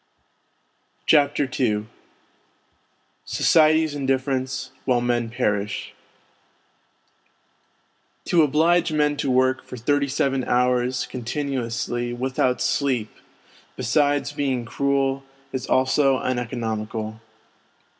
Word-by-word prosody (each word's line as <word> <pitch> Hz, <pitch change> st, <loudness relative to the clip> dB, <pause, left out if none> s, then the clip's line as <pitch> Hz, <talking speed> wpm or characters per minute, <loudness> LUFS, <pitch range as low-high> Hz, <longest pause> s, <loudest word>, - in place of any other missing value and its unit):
CHAPTER 145 Hz, -2 st, +3 dB
II 105 Hz, -4 st, +1 dB, 1.4 s
SOCIETY'S 155 Hz, -1 st, +3 dB
INDIFFERENCE 130 Hz, -1 st, -1 dB
WHILE 125 Hz, -2 st, +2 dB
MEN 120 Hz, -1 st, 0 dB
PEKISH 105 Hz, -4 st, -2 dB, 2.3 s
To 175 Hz, -, +4 dB
oblige 160 Hz, +4 st, +3 dB
men 150 Hz, -1 st, +2 dB
to 140 Hz, -, -1 dB
work 130 Hz, +1 st, +2 dB
for 125 Hz, -, -9 dB
thirty 140 Hz, +4 st, +1 dB
seven 135 Hz, -1 st, 0 dB
hours 125 Hz, 0 st, +1 dB
continuously 120 Hz, -2 st, -3 dB
without 130 Hz, 0 st, 0 dB
sleep, 130 Hz, -7 st, 0 dB, 0.6 s
besides 145 Hz, +3 st, +1 dB
being 135 Hz, -5 st, -1 dB
cruel, 135 Hz, +1 st, 0 dB, 0.3 s
is 130 Hz, -, -3 dB
also 130 Hz, +1 st, +3 dB
uneconomical. 110 Hz, -3 st, -3 dB
130 Hz, 85 wpm, -23 LUFS, 120-140 Hz, 2.3 s, To